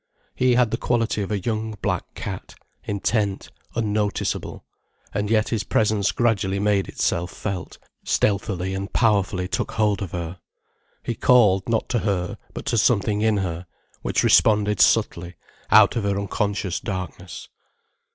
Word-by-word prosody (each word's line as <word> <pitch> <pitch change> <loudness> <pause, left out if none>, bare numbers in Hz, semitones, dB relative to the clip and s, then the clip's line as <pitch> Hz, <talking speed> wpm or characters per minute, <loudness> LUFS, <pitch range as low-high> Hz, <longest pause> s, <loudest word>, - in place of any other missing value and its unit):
He 125 -1 +2
had 120 -3 +3
the 115 - 0
quality 115 -3 0
of 100 - -3
a 105 - 0
young 110 +1 -3
black - - -2
cat, - - -6 0.3
intent, 100 0 -1 0.2
unnoticeable, 105 -2 -2 0.5
and 105 0 -1
yet 110 -1 +2
his 110 -4 -1
presence 105 0 +1
gradually 100 -5 +1
made 100 -1 +1
itself 85 +2 -1
felt, 95 -4 -5 0.3
stealthily 95 -2 0
and 95 +1 -4
powerfully 100 -5 +1
took - - -3
hold 105 -3 +1
of 95 - -4
her. 85 0 -5 0.6
He 120 - -2
called, 105 -5 +4
not 115 -1 0
to 120 - +1
her, 100 0 -2
but - - -7
to 115 - +1
something 105 -2 +2
in 110 -1 +2
her, 85 0 -5 0.3
which - - 0
responded 105 -2 +4
subtly, 85 +1 +2 0.3
out - - +6
of 115 - -1
her 100 0 0
unconscious 100 -2 -2
darkness. 95 -2 -6
105 Hz, 145 wpm, -23 LUFS, 95-110 Hz, 0.6 s, out